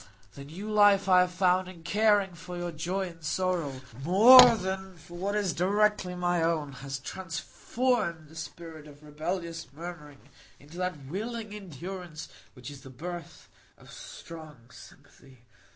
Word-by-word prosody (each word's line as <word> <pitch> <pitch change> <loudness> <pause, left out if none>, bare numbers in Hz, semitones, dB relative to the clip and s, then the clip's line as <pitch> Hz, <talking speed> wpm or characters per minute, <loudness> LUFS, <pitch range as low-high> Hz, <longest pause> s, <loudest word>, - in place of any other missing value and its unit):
The 140 - -10
new 180 +9 -8
life 205 -2 +4
I 185 -1 +6
have 180 0 +2
found 185 0 +2
in 175 -3 -12
caring 205 -1 +2
for 175 +1 -8
your 175 0 -3
joy 180 +4 -3
and 165 -1 -16
sorrow 165 -5 -1 0.2
more 235 - +9
than 190 -2 -5
for 170 +2 -13
what 195 +4 -2
is 200 -4 0
directly 200 0 +1
my 175 -1 0
own, 160 -3 0
has 135 +1 -6
transformed 185 - -2
the 160 - -16
spirit 160 -1 -9
of 145 0 -15
rebellious 165 +3 -4
murmuring 150 -3 -10 0.3
into 150 +5 -14
that 180 -6 -3
willing 215 - -5
endurance 180 -3 -8 0.3
which 125 +2 -9
is 140 -1 -11
the 135 - -12
birth 170 +5 -8 0.3
of - - -16
strong 155 - -11
sympathy. 130 -3 -17
175 Hz, 150 wpm, -28 LUFS, 155-190 Hz, 0.3 s, more